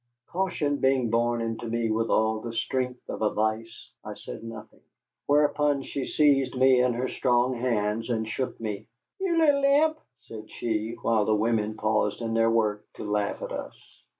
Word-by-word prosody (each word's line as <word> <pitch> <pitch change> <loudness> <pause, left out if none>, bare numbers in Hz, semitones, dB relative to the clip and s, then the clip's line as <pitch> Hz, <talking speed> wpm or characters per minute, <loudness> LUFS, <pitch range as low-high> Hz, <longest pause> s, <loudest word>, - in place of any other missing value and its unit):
Caution 170 -6 -1
being 130 -4 +2
born 120 0 +1
into 115 +1 -4
me 115 -1 -1
with 115 +1 0
all 110 0 +2
the 115 +1 -6
strength 125 +1 -2
of - - -6
a 105 - +3
vice, 110 +1 -3
I - - -7
said - - -9
nothing. 110 -1 -10 0.5
Whereupon 145 -1 +2
she 135 -1 -4
seized 135 -4 +3
me 130 -1 +5
in 125 -1 +2
her 125 +2 -1
strong 125 0 +1
hands 115 -2 -1
and 110 -2 -1
shook 125 +3 -3
me. 110 -2 -5 0.3
"Ye 385 -1 -1
little 290 -4 +4
imp!" 305 +3 +3 0.2
said 110 -1 -10
she, 110 0 -3
while 110 -2 +2
the 110 - +2
women 110 0 0
paused 110 -1 0
in 115 -1 -3
their 115 0 +3
work 110 -2 +1
to - - -7
laugh 105 -1 -1
at - - -5
us. - - -6
115 Hz, 180 wpm, -27 LUFS, 110-130 Hz, 0.5 s, me